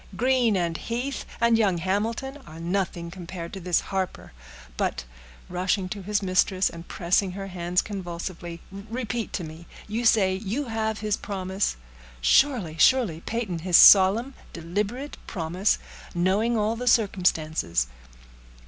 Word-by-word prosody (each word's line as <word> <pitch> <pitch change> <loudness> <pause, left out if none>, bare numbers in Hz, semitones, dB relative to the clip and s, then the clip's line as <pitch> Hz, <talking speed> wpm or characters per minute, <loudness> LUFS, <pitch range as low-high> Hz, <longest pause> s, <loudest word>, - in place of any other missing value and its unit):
Greene, 245 -4 +3
and 170 -2 -1
Heath, 245 - -4
and 235 -1 +4
young 195 -5 +2
Hamilton 220 +10 -2
are 160 +1 -10
nothing 170 -1 -2
compared 175 -1 -7
to 195 - -5
this 180 -1 +1
Harper. 190 -2 -4 0.4
But," - - -2 0.4
rushing 185 +1 -1
to 200 +1 -5
his 205 +2 -1
mistress, 185 0 +2
and 170 0 -10
pressing 180 +2 0
her 195 +1 -5
hands 180 -1 -1
convulsively, 175 -3 -6
"repeat 225 +3 -4
to 180 - -2
me—you 170 +8 -7
say 195 -4 +4
you 215 +9 -3
have 220 -2 -2
his 210 -1 0
promise?" 190 0 -2 0.4
"Surely, 175 - +3
surely, 220 -11 +4
Peyton; 220 -7 -2
his 175 +1 +4
solemn, 210 +7 +7 0.2
deliberate 205 - -3
promise, 180 +2 0 0.4
knowing 200 +7 +2
all 215 +1 +1
the 250 +2 -5
circumstances." 165 - +2
195 Hz, 130 wpm, -25 LUFS, 175-225 Hz, 0.4 s, solemn